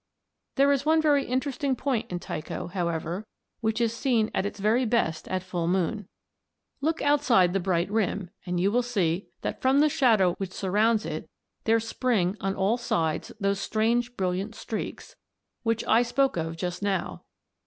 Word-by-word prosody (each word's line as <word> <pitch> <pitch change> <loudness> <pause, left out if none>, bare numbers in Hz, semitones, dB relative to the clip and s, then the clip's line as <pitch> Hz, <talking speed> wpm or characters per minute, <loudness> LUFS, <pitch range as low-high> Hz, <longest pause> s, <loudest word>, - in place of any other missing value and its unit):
"There 280 +1 +4
is 280 -1 +1
one 315 +2 +4
very 290 -3 +3
interesting 265 +1 -1
point 245 -4 -2
in 180 - -1
Tycho, 155 -2 -5
however, 175 +2 -3 0.3
which 220 0 0
is 230 -1 +1
seen 230 -3 +1
at 200 - 0
its 205 - -8
very 220 +5 +2
best 220 -9 0
at 185 -1 -2
full 175 -2 -2
moon. 190 +3 0 0.7
Look 320 +3 0
outside 270 -11 +4
the 195 - +2
bright 175 -2 0
rim 200 -4 -1
and 180 -1 -2
you 195 +3 +2
will 245 +3 +3
see 195 -7 -1 0.2
that - - -3
from 265 +2 +4
the 305 +1 +5
shadow 220 -11 +3
which 190 -2 -4
surrounds 210 +3 +1
it - - -5 0.4
there 225 +1 +4
spring 220 -5 0
on 195 0 -1
all 195 +5 +1
sides 165 -10 -1
those 200 -1 0
strange 235 +3 0
brilliant 190 +3 -2
streaks 220 - -5
(see - - -19
Fig. - - -35
3_a_) - - -56
which 230 0 +1
I 225 +2 +5
spoke 265 +3 +1
of 165 -1 -3
just 180 +1 -3
now. 190 - -2
215 Hz, 180 wpm, -27 LUFS, 185-245 Hz, 0.7 s, the